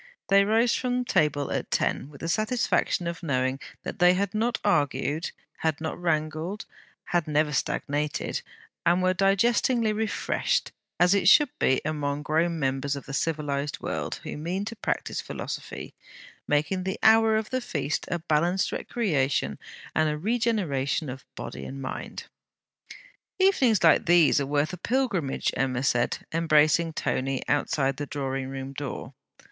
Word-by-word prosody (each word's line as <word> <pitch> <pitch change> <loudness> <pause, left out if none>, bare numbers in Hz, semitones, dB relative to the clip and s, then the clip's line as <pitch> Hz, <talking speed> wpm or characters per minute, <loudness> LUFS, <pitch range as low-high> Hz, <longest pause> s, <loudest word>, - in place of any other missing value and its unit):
They 200 0 +6
rose 225 +3 +3
from 250 0 -1
table 150 - +1
at - - -2
ten, 140 - 0
with 140 -2 -14
the 165 - -3
satisfaction 215 -2 +1
of 170 +1 -4
knowing 130 -4 0 0.2
that - - -6
they 180 0 +6
had 200 0 -1
not 225 +2 0
argued, 150 -2 +1 0.3
had 160 -2 -1
not 160 0 -3
wrangled, 160 +4 -1 0.4
had 175 -3 0
never 150 0 +1
stagnated, 145 +2 -1 0.4
and 175 +2 +3
were 185 0 +3
digestingly 215 +4 +2
refreshed; 220 +1 -1 0.3
as 180 +2 +5
it 200 -3 +2
should 295 +3 +6
be 130 - +3
among 145 -1 -2
grown 165 +3 +1
members 135 0 -1
of 140 - -8
the 135 - -8
civilized 145 -2 -2
world, - - -3
who - - -5
mean 180 +6 -3
to 230 +2 -5
practise - - -2
philosophy, - - -6 0.5
making 155 +6 +1
the 190 +1 -2
hour 220 0 +6
of 220 -1 -3
the 255 0 0
feast 155 - -2
a 175 - 0
balanced 170 +3 +1
recreation 140 - -1 0.3
and 155 -1 +2
a 150 - -2
regeneration 180 - 0
of 130 +1 -8
body - - -7
and 135 - -7
mind. 130 - -6 1.1
'Evenings 275 - +3
like 165 - +5
these 170 -4 +5
are 140 - -2
worth 145 +3 0
a - - -4
pilgrimage,' 200 - 0
Emma 130 -1 0
said, 120 -3 +1 0.2
embracing 160 0 +3
Tony 135 -3 -1
outside 135 -2 +1
the 145 0 -4
drawing 135 -2 -3
room 135 0 -6
door. 140 -1 -6
160 Hz, 150 wpm, -26 LUFS, 145-200 Hz, 1.1 s, They